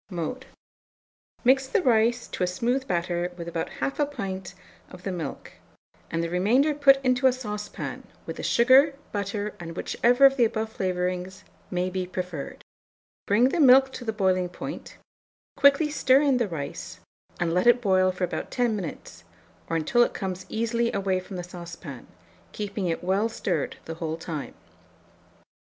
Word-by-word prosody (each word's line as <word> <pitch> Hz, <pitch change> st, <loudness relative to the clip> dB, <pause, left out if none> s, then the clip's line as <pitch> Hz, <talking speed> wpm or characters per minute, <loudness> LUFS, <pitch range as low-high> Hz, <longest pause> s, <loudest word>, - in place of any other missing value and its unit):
Mode. 195 Hz, +9 st, -4 dB, 1.0 s
Mix 265 Hz, +1 st, +4 dB
the 310 Hz, -, +1 dB
rice 235 Hz, 0 st, +2 dB
to -, -, -7 dB
a -, -, +2 dB
smooth 240 Hz, +9 st, -1 dB
batter 175 Hz, 0 st, -1 dB
with 170 Hz, -1 st, -7 dB
about 165 Hz, -1 st, -3 dB
1/2 285 Hz, +1 st, 0 dB
pint 190 Hz, -6 st, -5 dB, 0.3 s
of 180 Hz, 0 st, -13 dB
the 195 Hz, -, -2 dB
milk, 165 Hz, -6 st, -6 dB, 0.6 s
and 165 Hz, 0 st, -1 dB
the 170 Hz, -, -2 dB
remainder 240 Hz, -, +3 dB
put 280 Hz, -2 st, +6 dB
into 255 Hz, +1 st, +4 dB
a -, -, +5 dB
saucepan, 210 Hz, -5 st, -6 dB, 0.2 s
with -, -, -6 dB
the -, -, -5 dB
sugar, 265 Hz, +4 st, +5 dB, 0.2 s
butter, 205 Hz, 0 st, -3 dB
and 165 Hz, 0 st, -8 dB
whichever 245 Hz, +3 st, +3 dB
of 270 Hz, 0 st, +5 dB
the 245 Hz, -, +4 dB
above 220 Hz, 0 st, -2 dB
flavourings 185 Hz, +1 st, -2 dB, 0.3 s
may 180 Hz, 0 st, -1 dB
be 185 Hz, 0 st, -3 dB
preferred; 180 Hz, -5 st, -6 dB, 0.6 s
bring 230 Hz, +6 st, +4 dB
the 340 Hz, -, -1 dB
milk 265 Hz, -1 st, +7 dB
to -, -, -7 dB
the 225 Hz, -, -1 dB
boiling 185 Hz, -4 st, +1 dB
point, -, -, -8 dB, 0.6 s
quickly 280 Hz, +2 st, +4 dB
stir 270 Hz, -1 st, +4 dB
in 275 Hz, -3 st, +3 dB
the 235 Hz, -3 st, +1 dB
rice, 150 Hz, -6 st, -6 dB, 0.4 s
and 170 Hz, -1 st, 0 dB
let 180 Hz, +6 st, +2 dB
it 240 Hz, 0 st, +6 dB
boil 185 Hz, -4 st, +3 dB
for 185 Hz, 0 st, -5 dB
about 180 Hz, -, -3 dB
10 245 Hz, -3 st, 0 dB
minutes, 180 Hz, -7 st, -7 dB, 0.5 s
or 165 Hz, -, -1 dB
until 165 Hz, +10 st, +2 dB
it -, -, +2 dB
comes 185 Hz, -1 st, -4 dB
easily 230 Hz, +1 st, 0 dB
away 190 Hz, -1 st, 0 dB
from 185 Hz, +1 st, -9 dB
the 180 Hz, -, -4 dB
saucepan, 170 Hz, -6 st, -9 dB, 0.5 s
keeping 200 Hz, -2 st, -3 dB
it 165 Hz, 0 st, -2 dB
well 195 Hz, +5 st, +1 dB
stirred 180 Hz, -8 st, -2 dB
the 165 Hz, -, -5 dB
whole 160 Hz, -1 st, -2 dB
time. 155 Hz, -6 st, -6 dB
200 Hz, 165 wpm, -26 LUFS, 180-245 Hz, 1.0 s, milk